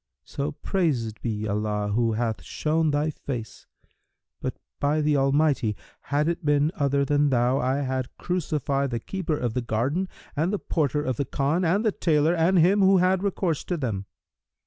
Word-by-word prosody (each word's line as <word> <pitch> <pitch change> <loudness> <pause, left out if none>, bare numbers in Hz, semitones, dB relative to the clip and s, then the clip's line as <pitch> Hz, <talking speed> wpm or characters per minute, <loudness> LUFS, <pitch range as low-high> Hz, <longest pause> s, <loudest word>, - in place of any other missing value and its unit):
'So 140 +1 -4
praised 130 - -1
be 110 -2 -2
Allah 105 0 -1
who 115 +2 +1
hath 110 -1 -1
shown 160 +1 0
thy 150 +1 +1
face! 125 -6 -7 0.7
But, - - -3 0.2
by 145 +2 +1
the 150 -1 +2
almighty, 135 -5 +2 0.3
had 145 +2 +1
it 170 +1 -1
been 145 +1 +2
other 140 -1 +1
than 145 +1 +2
thou, 125 +1 +2
I 130 +2 0
had 130 -2 -3
crucified 145 -6 -1
the 120 -2 -2
keeper 175 - -3
of 120 -4 -2
the 125 - -1
garden 130 +12 -1 0.3
and 160 +5 +1
the 205 - 0
porter 150 -6 -1
of 130 -4 -2
the 140 - 0
Khan 145 +7 0
and 190 +7 +2
the 215 - +4
tailor 160 -3 +2
and 175 +2 +3
him 180 +5 +5
who 190 0 +6
had 185 +1 +3
recourse 185 -5 -1
to 175 - -2
them!' 105 -9 -3
145 Hz, 175 wpm, -25 LUFS, 125-165 Hz, 0.7 s, who